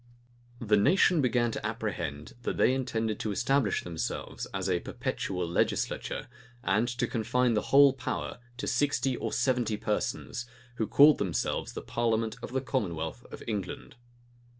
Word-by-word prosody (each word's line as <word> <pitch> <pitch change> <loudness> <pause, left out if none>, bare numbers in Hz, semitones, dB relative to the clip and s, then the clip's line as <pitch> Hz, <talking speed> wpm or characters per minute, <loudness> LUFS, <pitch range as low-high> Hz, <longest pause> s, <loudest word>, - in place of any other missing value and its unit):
The 105 -4 +3
nation 175 - +4
began 120 -2 +2
to - - -5
apprehend 90 -10 -4
that - - -2
they 130 - +4
intended 115 -5 -1
to 110 - -2
establish 130 +1 +1
themselves 85 -2 -4
as 95 -1 -2
a 90 -2 +2
perpetual 90 0 -3
legislature, 85 - -1 0.4
and 110 +3 +2
to 120 -1 -1
confine 120 +2 +1
the 105 - +2
whole 140 -1 +7
power 135 - -4 0.2
to - - -4
sixty 130 -1 +1
or - - -3
seventy 125 -5 +1
persons, 120 +3 -2 0.3
who 110 - 0
called 145 +1 +7
themselves 85 -8 -1
the - - -6
parliament 115 -1 0
of - - -6
the 130 +1 0
commonwealth 100 - -3
of - - -8
England. 100 -5 -4
115 Hz, 150 wpm, -29 LUFS, 100-130 Hz, 0.4 s, whole